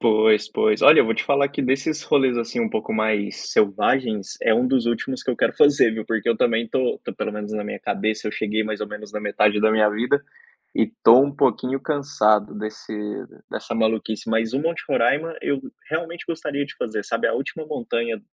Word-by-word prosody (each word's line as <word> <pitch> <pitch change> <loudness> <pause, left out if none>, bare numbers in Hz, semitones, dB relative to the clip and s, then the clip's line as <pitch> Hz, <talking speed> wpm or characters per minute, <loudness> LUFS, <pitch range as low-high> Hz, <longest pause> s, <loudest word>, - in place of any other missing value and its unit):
Pois, 110 -1 +3
pois. 110 0 +1
Olha, - - +8
eu - - +4
vou 115 - 0
te - - -2
falar 140 0 +2
que 140 - -4
desses 135 +4 -1
rolês 130 -3 +2
assim, 120 - -3
um 225 -1 -1
pouco 220 - -3
mais 110 -2 -1
selvagens, 105 +1 +1
é 110 - +3
um 125 +2 +2
dos 130 -2 +1
últimos 120 +3 -2
que 130 - 0
eu 120 - -2
quero - - +1
fazer, 145 -5 +5
viu, 110 -1 -5
porque 110 -2 -1
eu 115 - +3
também 115 0 +1
tô 130 -1 -1
tô - - -5
pelo 110 - -4
menos 105 0 -6
na 105 -1 -3
minha - - -6
cabeça, 110 0 -2
eu - - -5
cheguei 110 0 -1
mais 110 -1 -4
ou 105 - -3
menos 105 0 -9
na 105 - -4
metade 105 0 +1
da 110 0 +3
minha 110 -1 +4
vida, 125 +7 0 0.5
e - - +2 0.2
tô 120 +3 +8
um 140 0 +1
pouquinho 130 +1 +1
cansado 110 -9 +1
desse 110 +1 -7 0.6
dessa - - -5
maluquice. 110 -1 -1
Mas 110 0 0
o 135 - +1
Monte 165 +2 -2
Roraima 155 +8 +1
eu 140 -1 -1 0.3
realmente 165 +2 -4
gostaria 150 -4 -3
de - - -11
fazer, 110 -3 -4
sabe, 115 - 0
a - - -1
última 155 +3 -4
montanha 115 -5 -3
115 Hz, 215 wpm, -22 LUFS, 110-135 Hz, 0.6 s, Olha